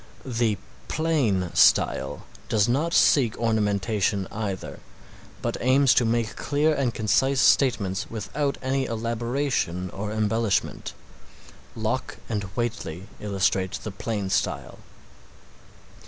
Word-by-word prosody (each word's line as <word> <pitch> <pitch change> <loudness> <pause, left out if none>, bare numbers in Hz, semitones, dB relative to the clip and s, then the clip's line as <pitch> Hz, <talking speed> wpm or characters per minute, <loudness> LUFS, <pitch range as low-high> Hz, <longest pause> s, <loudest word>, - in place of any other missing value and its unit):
The 115 -4 0 0.3
plain 130 - 0
style - - +3 0.2
does 105 -2 +3
not 145 +8 +1
seek 125 -8 +4
ornamentation 105 -3 0
either, 100 -3 -4 0.6
but - - -1
aims 130 +1 +5
to 125 - +3
make 115 -1 0
clear 150 +2 +1
and 140 -4 0
concise 130 +5 +1
statements 115 -8 +2
without 140 +6 -2
any 135 0 0
elaboration 115 -5 -2
or 105 +2 -5
embellishment. 110 -1 0 0.8
Locke - - -2
and 105 -3 -2
Whately 115 -6 -4
illustrate 95 -1 0
the 110 - -4
plain 100 -1 -3
style. - - -1
115 Hz, 105 wpm, -25 LUFS, 100-130 Hz, 0.8 s, aims